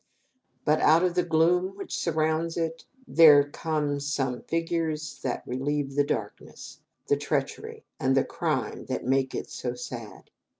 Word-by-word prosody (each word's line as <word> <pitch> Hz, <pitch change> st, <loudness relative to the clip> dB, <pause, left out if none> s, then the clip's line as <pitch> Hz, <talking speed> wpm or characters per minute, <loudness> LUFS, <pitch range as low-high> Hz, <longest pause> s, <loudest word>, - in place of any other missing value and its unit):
But 155 Hz, 0 st, +3 dB
out 165 Hz, +3 st, +5 dB
of 180 Hz, -1 st, +2 dB
the 180 Hz, -, +2 dB
gloom 175 Hz, +3 st, +2 dB
which 200 Hz, -, -5 dB
surrounds 160 Hz, 0 st, 0 dB
it, 165 Hz, -1 st, -3 dB, 0.2 s
there 150 Hz, -3 st, +7 dB
come 150 Hz, -1 st, -2 dB
some 135 Hz, -3 st, -2 dB
figures 165 Hz, -2 st, -2 dB
that 125 Hz, -, -3 dB
relieve 140 Hz, +2 st, -2 dB
the 145 Hz, +1 st, +3 dB
darkness, -, -, -5 dB, 0.3 s
the 425 Hz, -1 st, +3 dB
treachery, 450 Hz, 0 st, -3 dB
and 135 Hz, -2 st, +2 dB
the 135 Hz, -, +3 dB
crime 150 Hz, -10 st, -2 dB
that 130 Hz, -, -3 dB
make 135 Hz, +1 st, +1 dB
it -, -, -5 dB
so 125 Hz, -1 st, -4 dB
sad. 120 Hz, -3 st, -8 dB
155 Hz, 145 wpm, -27 LUFS, 135-165 Hz, 0.3 s, there